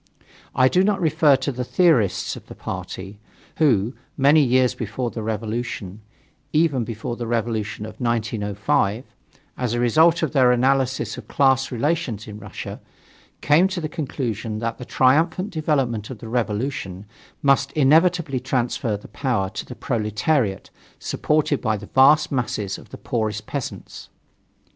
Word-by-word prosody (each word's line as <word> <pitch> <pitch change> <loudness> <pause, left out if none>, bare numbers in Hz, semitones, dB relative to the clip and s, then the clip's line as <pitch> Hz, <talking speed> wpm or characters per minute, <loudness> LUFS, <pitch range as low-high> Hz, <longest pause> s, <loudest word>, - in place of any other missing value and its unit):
I 130 0 +5
do 180 +7 +3
not 200 0 +1
refer 155 -3 +4
to 135 +1 -2
the 125 -1 -4
theorists 135 - +2
of - - -12
the - - -10
party, 95 +2 -7 0.4
who, 120 -7 +2 0.2
many 145 +3 +5
years 130 -1 +3
before 115 +2 -4
the 115 - -5
revolution 110 -2 -4 0.5
even 150 -5 +2
before 115 +1 -5
the 120 -1 -5
revolution 110 -2 -2
of 110 +3 -10
1905 110 -2 0 0.6
as 125 -2 -1
a - - -1
result 160 +8 +4
of 160 - 0
their 130 -4 +4
analysis 130 +1 +1
of - - -12
class 135 -1 +2
relations 125 - -1
in 105 0 -8
Russia, - - -8 0.6
came 160 +6 +4
to 190 -1 -4
the 155 - -3
conclusion 120 -8 -4
that 115 +1 -3
the 125 - -7
triumphant 160 - +2
development 135 - -1
of 130 - -7
the 115 - -9
revolution 110 -4 -2 0.4
must 140 0 +3
inevitably 155 0 +3
transfer 120 -4 -1
the 100 - -13
power 115 -9 -1
to - - -6
the 125 - -8
proletariat, 110 - -1 0.3
supported 150 -2 0
by 110 -1 0
the 105 - -9
vast 145 +3 +5
masses 110 -7 -2
of - - -16
the - - -9
poorest 110 -2 -2
peasants. 140 -4 -6
125 Hz, 150 wpm, -22 LUFS, 110-145 Hz, 0.6 s, I